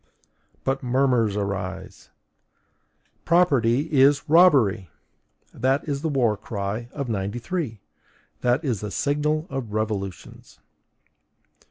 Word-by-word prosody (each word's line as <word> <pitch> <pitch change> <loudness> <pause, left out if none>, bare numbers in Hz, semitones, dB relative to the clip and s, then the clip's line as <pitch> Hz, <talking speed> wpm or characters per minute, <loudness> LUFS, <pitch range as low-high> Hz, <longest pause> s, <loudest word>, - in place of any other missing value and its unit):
But 135 0 -1
murmurs 125 -4 +1
arise! 95 -2 -5 1.1
PROPERTY 145 -4 +2
IS 140 +1 +5
ROBBERY! 140 - +4 0.6
That 135 +4 0
is 140 -2 -2
the 160 - -1
war 125 -7 +2
cry 105 +2 -5
of 140 -3 -5
'93! 115 - -3 0.6
That 125 +6 +1
is 120 -8 -1
the 105 - -4
signal 150 +6 -1
of 120 -6 -5
revolutions! 105 -3 -5
125 Hz, 95 wpm, -24 LUFS, 105-145 Hz, 1.1 s, IS